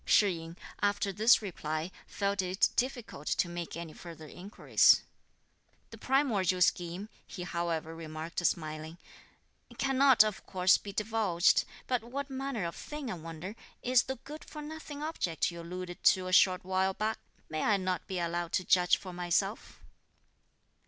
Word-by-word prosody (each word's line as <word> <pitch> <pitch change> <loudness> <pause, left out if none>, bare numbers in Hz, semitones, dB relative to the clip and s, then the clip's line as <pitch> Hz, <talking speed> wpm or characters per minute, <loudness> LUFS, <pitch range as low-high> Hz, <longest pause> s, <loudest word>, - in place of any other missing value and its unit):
Shih 205 - +5
yin, 165 +1 -10 0.2
after 205 0 +1
this 220 +3 +5
reply, 155 -3 -3 0.2
felt 200 -1 -1
it 185 +2 +2
difficult 240 - -2
to - - +1
make 175 -1 -5
any 170 -2 -7
further 165 -2 -10
inquiries. 190 +7 +3 0.9
"The - - -11
primordial 215 -10 +2
scheme," 175 +3 0 0.2
he 180 - -7
however 170 -2 -2
remarked 160 +1 -5
smiling, 155 -1 -2 0.8
"cannot, 270 -3 +5
of 215 -2 -3
course, 185 -1 +4
be 200 - -7
divulged; 210 -4 +2 0.2
but 250 -3 0
what 275 +4 -5
manner 265 -7 -3
of 170 - -4
thing, 295 -5 -6
I - - -2
wonder, 165 +4 -7 0.3
is 250 0 +5
the 265 - -4
good 295 +5 -10
for 300 -1 -9
nothing 300 -1 -7
object 185 - -1
you 170 0 -8
alluded 175 +1 -7
to 185 -1 +5
a 185 - -3
short 185 -1 +5
while 190 0 +1
back? 215 +1 -1 0.3
May 155 0 -3
I 210 -2 +3
not 185 -1 -2
be 190 - -3
allowed 170 0 -2
to 185 - +1
judge 180 -1 +4
for 185 -2 -9
myself?" 180 +4 -1
185 Hz, 155 wpm, -31 LUFS, 170-225 Hz, 0.9 s, Shih